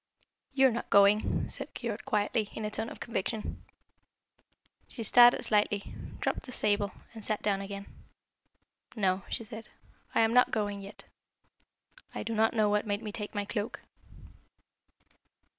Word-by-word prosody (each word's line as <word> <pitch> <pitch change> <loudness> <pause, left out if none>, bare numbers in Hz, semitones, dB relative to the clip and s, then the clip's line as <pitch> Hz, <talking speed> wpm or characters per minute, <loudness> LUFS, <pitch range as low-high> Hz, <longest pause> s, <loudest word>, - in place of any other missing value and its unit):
"You 270 -1 +5
are - - +1
not 235 - -4
going?" 200 +1 +4
said - - -8
Keyork - - -4
quietly, 210 +1 0
in 220 - -4
a 210 - -3
tone 225 - -2
of - - -10
conviction. 220 -1 -4 1.2
She 230 - +1
started 240 +2 +6
slightly, 205 -1 +1 0.3
dropped - - -2
the - - -7
sable, 205 -3 +1 0.2
and 220 -2 -10
sat 215 0 -2
down 200 -2 +1
again. 200 0 -6 1.1
"No," 190 -3 +1
she - - -2
said, 220 0 -9 0.5
"I - - +5
am 225 0 +3
not 250 0 +6
going 205 -2 -2
yet. 200 +1 -10 1.1
I - - -3
do 230 - -3
not 220 +1 +2
know 215 -2 +3
what 210 +1 +1
made 205 +2 -1
me 210 - -4
take 210 0 -6
my 205 0 -1
cloak." 205 +2 -4
210 Hz, 155 wpm, -30 LUFS, 205-225 Hz, 1.2 s, started